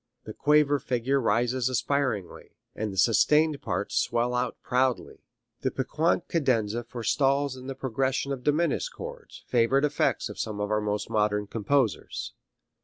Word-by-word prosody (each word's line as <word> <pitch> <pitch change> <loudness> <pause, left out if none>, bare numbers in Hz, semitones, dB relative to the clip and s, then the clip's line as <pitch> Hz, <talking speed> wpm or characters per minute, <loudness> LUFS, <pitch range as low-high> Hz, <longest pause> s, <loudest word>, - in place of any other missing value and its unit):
The 110 - -8
quaver 150 +1 +3
figure 130 +2 0
rises 120 +3 +1
aspiringly, 130 -7 -2 0.2
and 110 -1 -3
the 95 - -8
sustained 145 +9 +3
parts - - -2
swell 120 +1 0
out 125 0 -1
proudly. 125 0 0 0.4
The - - 0
piquant 160 +6 0
cadenza 120 -7 0
forestalls 135 +4 0
in 130 0 -10
the 135 - -5
progression 135 +1 -1
of 130 -2 -4
diminished 170 - +1
chords 485 0 -9
favorite 130 +4 +3
effects 150 0 0
of - - -9
some 105 -2 -3
of 105 +1 -2
our 105 0 +2
more 105 0 0
modern 105 -1 +1
composers. 115 +2 -1
130 Hz, 145 wpm, -27 LUFS, 110-140 Hz, 0.4 s, quaver